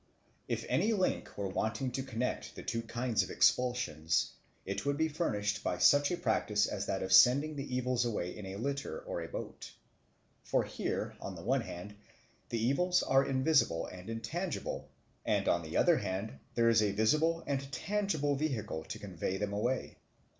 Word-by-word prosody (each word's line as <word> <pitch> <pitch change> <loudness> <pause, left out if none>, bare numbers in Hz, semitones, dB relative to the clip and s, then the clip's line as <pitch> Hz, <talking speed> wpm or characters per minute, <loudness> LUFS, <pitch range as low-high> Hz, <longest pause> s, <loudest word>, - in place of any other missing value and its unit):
If - - -2
any 225 - +2
link 190 -3 -1
were 100 -1 -1
wanting 110 +6 -1
to 135 - -2
connect 125 -2 -3
the - - -8
two 115 -2 -2
kinds 115 0 0
of - - -4
expulsion, 120 -11 +1 0.6
it 100 +1 -3
would 140 0 0
be 160 +1 +2
furnished 110 - -1
by 90 - -1
such 145 +10 +5
a 175 - -1
practice 105 -10 +1
as 100 -1 -3
that 95 - -1
of 95 0 0
sending 135 +10 +6
the 140 -2 -4
evils 125 -1 +1
away 105 -7 -2
in 105 -2 -7
a 95 - -6
litter 140 - -3
or - - -4
a - - -5
boat. - - -7 0.7
For - - +1
here, - - -3
on - - -5
the - - -9
one - - +2
hand, 105 +4 -8 0.5
the 115 - -1
evils 180 +8 +2
are 135 0 +4
invisible 135 - +2
and 90 +3 -9
intangible; 150 +11 -4 0.3
and, - - +1
on 85 - +3
the 80 -1 -4
other - - +5
hand, 95 +4 -4 0.2
there 115 -1 +4
is 115 -1 +5
a 105 -2 +1
visible 155 +10 +2
and 140 0 -2
tangible 160 -4 0
vehicle 120 - -2
to - - -6
convey 95 -1 -3
them 100 0 -2
away. 120 +6 -1
120 Hz, 180 wpm, -33 LUFS, 105-140 Hz, 0.7 s, sending